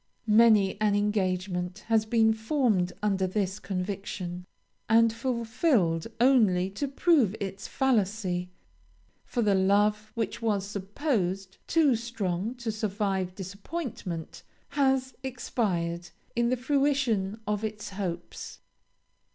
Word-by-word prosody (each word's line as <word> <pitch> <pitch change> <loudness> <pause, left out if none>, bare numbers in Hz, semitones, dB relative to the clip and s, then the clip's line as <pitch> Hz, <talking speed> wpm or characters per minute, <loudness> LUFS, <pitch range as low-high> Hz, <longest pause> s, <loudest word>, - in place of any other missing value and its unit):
Many 215 -3 +5
an 210 -1 +3
engagement 185 -2 -1
has 220 -1 +2
been 220 -1 +4
formed 220 -6 +1
under 195 -2 +1
this 195 +1 -1
conviction, 185 -2 -4 0.4
and 230 0 +5
fulfilled 230 - +1
only 210 -8 +4
to 280 +9 -3
prove 275 - +3
its 195 0 -5
fallacy, 200 -8 0 0.7
for 240 - -1
the 205 -2 +3
love 205 +3 +2
which 230 0 -2
was 205 -4 0
supposed 195 - -2
too 300 -6 +4
strong 225 -2 -3
to 240 -2 -3
survive 200 -3 -2
disappointment, 195 - -6 0.3
has 265 -2 +1
expired 180 -9 -2 0.3
in 235 0 +2
the 255 - +1
fruition 255 -6 +1
of 210 0 -1
its 215 -1 -4
hopes. 180 -3 -5
210 Hz, 110 wpm, -28 LUFS, 190-235 Hz, 0.7 s, Many